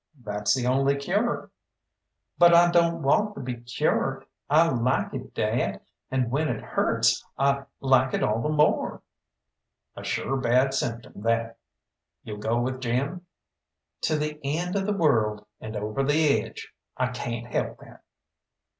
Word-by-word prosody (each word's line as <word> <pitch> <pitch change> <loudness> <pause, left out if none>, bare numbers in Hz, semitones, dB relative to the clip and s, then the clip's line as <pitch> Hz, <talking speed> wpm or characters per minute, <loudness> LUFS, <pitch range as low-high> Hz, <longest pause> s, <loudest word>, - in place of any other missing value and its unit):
"That's 105 0 0
the 125 -2 -2
only 135 +2 +2
cure." 200 +12 -1 0.9
"But 175 -1 +7
I 175 0 +6
don't 170 -2 +2
want 205 +10 +2
to - - -7
be 125 -1 -4
cured. 120 +2 -1 0.2
I 160 +3 +5
like 125 0 0
it, - - -7
dad, - - -1 0.3
and 130 -3 0
when 150 +4 +1
it - - -3
hurts - - +1
I 140 0 +1 0.2
like 130 -1 +3
it - - -1
all 110 +2 +1
the 150 - -1
more." 150 0 +1 0.9
"A - - -8
sure 135 - -1
bad 130 +1 +2
symptom 115 -5 -4
that. 115 +1 -1 0.6
You'll 105 -1 -7
go 115 +3 0
with 130 +1 -2
Jim?" 140 +9 -2 0.7
"To 155 - +1
the 150 0 -3
end 170 +6 -2
of 195 0 0
the 210 - +1
world, 110 - +2
and 110 0 -7
over 105 +5 -2
the 145 +1 +3
edge - - -11 0.2
I 125 0 0
cayn't 120 -1 -5
help - - -1
that." - - -15
135 Hz, 155 wpm, -26 LUFS, 120-155 Hz, 0.9 s, But